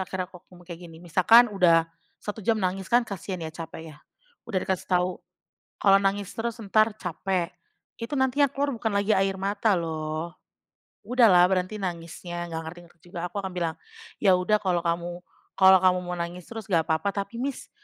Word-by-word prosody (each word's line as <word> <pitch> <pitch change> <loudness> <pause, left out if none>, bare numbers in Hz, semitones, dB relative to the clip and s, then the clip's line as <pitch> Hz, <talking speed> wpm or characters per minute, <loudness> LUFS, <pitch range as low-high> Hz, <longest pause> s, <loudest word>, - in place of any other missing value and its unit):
akhirnya 190 0 -3
aku 180 -1 -14
ngomong 175 -1 -16
kayak 170 0 -9
gini. 160 - -13
Misalkan 215 +7 +5
udah 170 -4 +4 0.3
1 210 +1 -6
jam 225 +3 +1
nangis, 190 -1 -2
kan 240 0 +4
kasian 185 -3 -6
ya, 160 - -6
capek 160 -1 -8
ya. 145 - -16 0.5
Udah 200 -5 0
dikasih 190 -2 -3
tau, 180 0 0 0.6
"Kalau 195 -1 +6
nangis 200 0 0
terus 235 +1 -3
entar 215 +1 +2
capek, 180 0 -2 0.5
itu 230 +3 -7
nantinya 265 +1 +2
keluar 280 -1 -1
bukan 225 -1 -2
lagi 200 +1 +2
air 195 0 0
mata 205 +3 +1
loh. 160 +1 -4 0.7
Udahlah 220 -8 +6
berhenti 185 +3 -1
nangisnya!" 175 -1 -5
Nggak 160 - -3
ngerti-ngerti 175 0 -12
juga. 175 0 -5
Aku 205 - -3
akan 190 -2 -5
bilang, 170 -2 -1 0.4
"ya 190 -3 +5
udah 195 +4 +2
kalau 180 -4 0
kamu 170 +1 -1 0.4
kalau 190 0 +7
kamu 185 0 +3
mau 180 0 -5
nangis 170 0 -6
terus 225 -2 -7
nggak 175 -5 +2
papa, 160 +5 0
tapi 200 +3 -4
Miss, 270 +2 -4
185 Hz, 180 wpm, -26 LUFS, 175-210 Hz, 0.7 s, kalau